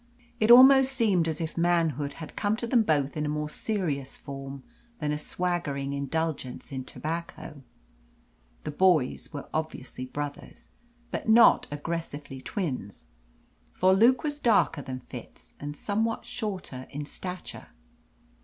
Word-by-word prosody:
It 215 - +2
almost 265 +2 +9
seemed 205 -10 +2
as 160 -1 -2
if 165 -1 -4
manhood 165 -5 +1
had 155 0 -9
come 205 +1 +1
to 235 - -3
them 235 0 +4
both 145 -8 +1
in 150 - -1
a 150 - -1
more 150 0 -2
serious 155 -12 -2
form 135 -1 -8 0.3
than 150 -2 -2
a 150 - 0
swaggering 150 -5 -2
indulgence 140 -1 -3
in 130 -1 -4
tobacco. 160 -2 -6 1.0
The - - -4
boys 160 -5 +2
were 145 -2 -7
obviously 150 -5 -4
brothers, 145 +1 -7 0.4
but - - -3
not 230 +1 +7
aggressively 145 -3 -5
twins. 130 - -4 0.7
For 185 +1 +4
Luke 235 +7 +5
was 295 -1 -2
darker 225 - +3
than 130 -1 -6
Fitz, - - -11
and 145 +1 -6
somewhat 220 +6 -1
shorter 200 - -5
in 145 +1 -5
stature. 180 +4 -7
160 Hz, 135 wpm, -28 LUFS, 140-200 Hz, 1.0 s, almost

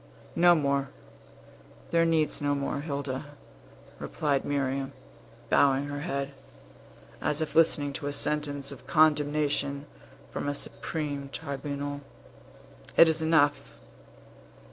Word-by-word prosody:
"No 175 0 +6
more; 140 -3 +1 1.0
there 165 0 +4
needs 160 -3 +1
no 145 0 +1
more, 140 0 -2
Hilda," 140 -3 -3 0.8
replied 140 -3 -1
Miriam, 135 -1 -1 0.6
bowing 135 0 +4
her 145 0 -4
head, 140 -3 -3 0.9
as 150 - 0
if 155 -2 -2
listening 150 -3 +3
to 145 0 -4
a - - -1
sentence 145 -1 0
of 140 - -11
condemnation 145 -2 +2 0.5
from - - -3
a 145 - -1
supreme 145 -2 -4
tribunal. 145 -1 -4 1.0
"It 165 - +9
is 160 0 +1
enough! 155 -3 +2
145 Hz, 110 wpm, -28 LUFS, 140-155 Hz, 1.0 s, It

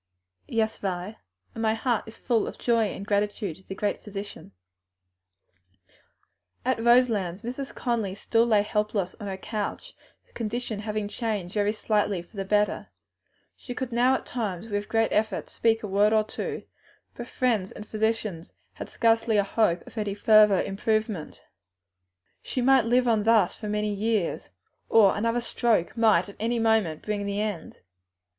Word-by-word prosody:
"Yes, 220 -1 -1
Vi, 190 +2 -3 0.4
and 225 - -6
my 220 -1 +2
heart 235 -1 0
is 220 - -11
full 235 -4 0
of - - -7
joy 230 -2 +2
and 200 -1 -5
gratitude 205 -3 -1
to 190 - -20
the 190 - -6
Great 205 +1 -2
Physician." 200 - -8 2.1
At 255 -3 0
Roselands 225 -7 +3
Mrs. 255 +3 -5
Conly 225 -6 -1
still 230 +3 +1
lay 210 -3 +4
helpless 210 -3 -1
on 205 - -6
her 190 -1 -4
couch, 215 - -5 0.3
her - - -31
condition 230 -1 -3
having 210 0 -3
changed 205 -5 -3
very 205 -1 +1
slightly 210 -4 0
for 175 - -22
the 195 - -2
better; 210 +1 +1 0.7
she 245 - -8
could 255 -1 -4
now 245 +3 +3
at - - -5
times, 215 -5 -4
with 205 0 -3
great 225 0 +2
effort, 215 -2 -1
speak 225 -1 +1
a - - -3
word 205 +2 +3
or 215 -1 +4
two, 215 - -5 0.5
but 240 - -8
friends 225 -9 0
and 210 - -9
physicians 215 -6 -2 0.2
had - - -8
scarcely 225 -1 +2
a 200 - +4
hope 195 -4 +1
of - - -14
any 205 -2 -2
further 210 -2 +6
improvement; 215 -3 -2 1.0
she - - -4
might 260 -1 +4
live 245 +2 +3
on 225 -2 +3
thus 225 0 +4
for 215 - -8
years, 210 -1 -1 0.4
or 210 -4 +6
another 230 +3 0
stroke 230 -6 0
might 215 -7 +4
at 200 - -12
any 230 +2 0
moment 220 -9 +1
bring 210 -1 -2
the 200 0 -2
end. 210 -6 -4
215 Hz, 160 wpm, -26 LUFS, 200-230 Hz, 2.1 s, further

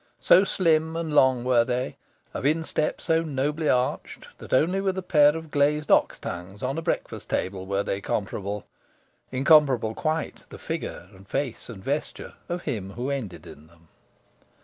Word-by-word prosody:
So 185 - +6
slim 160 -4 +1
and 165 -2 -3
long 130 -4 +4
were 125 -2 +4
they, 125 +1 -2 0.4
of - - -4
instep 155 +1 0
so 165 0 +1
nobly 150 0 -1
arched, 125 0 -1
that - - -11
only 175 +9 +3
with 190 -1 -1
a 190 - -3
pair 150 -3 +5
of 160 -2 -9
glazed 150 +1 +1
ox - - +4
tongues 90 +5 -7
on 135 +5 -1
a - - -4
breakfast - - -3
table 95 0 -2
were 100 +1 0
they 100 0 -3
comparable. 100 -1 -3 0.7
Incomparable 135 -4 +4
quite, 160 +4 -3
the - - -10
figure 85 - -5
and 95 +1 -16
face 135 -3 -3
and 100 -5 -9
vesture 145 +6 -3 0.2
of 175 0 -3
him 100 -9 -4
who 125 +5 -3
ended 100 - -5
in 75 +2 -13
them. 85 0 -24
135 Hz, 170 wpm, -25 LUFS, 105-155 Hz, 0.7 s, So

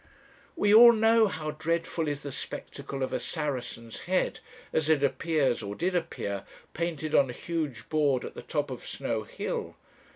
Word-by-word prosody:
"We 205 -11 +3
all 235 +2 +10
know 225 0 +5
how 155 -5 -3
dreadful 165 +1 -1
is 145 -1 -2
the 145 - -6
spectacle 140 0 -5
of 130 - -2
a - - 0
Saracen's 125 -7 -4
head, 185 0 +1 0.3
as 155 -1 +1
it 150 -3 +4
appears, 140 -2 +1
or 100 -1 -5
did 180 - -1
appear, 100 - -2 0.3
painted 160 -2 -3
on 135 -2 +5
a - - -4
huge 155 -5 -4
board 145 -5 +2
at - - -7
the - - -8
top 145 -3 -2
of 125 - -6
Snow - - -3
Hill. - - -4
150 Hz, 170 wpm, -28 LUFS, 135-170 Hz, 0.3 s, all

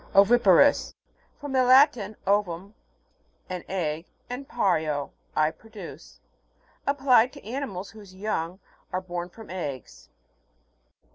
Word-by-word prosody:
OVI'PAROUS. 210 +5 +5 0.4
From 290 -1 -6
the 260 -1 +3
Latin, 255 -5 +5
ovum, 195 -1 0 0.8
an 180 -2 -4
egg, 165 -3 -2 0.2
and 260 +2 -5
pario, 155 -10 0 0.2
I 155 0 +3
produce. 225 +5 -12 0.7
Ap 280 0 +1
plied 255 -2 +5
to - - -13
animals 220 -6 -5
whose 205 -4 -14
young 185 -3 -3 0.3
are 185 - 0
born 175 -1 -5
from 220 +1 -12
eggs. 145 - -6
200 Hz, 115 wpm, -26 LUFS, 175-245 Hz, 0.8 s, OVI'PAROUS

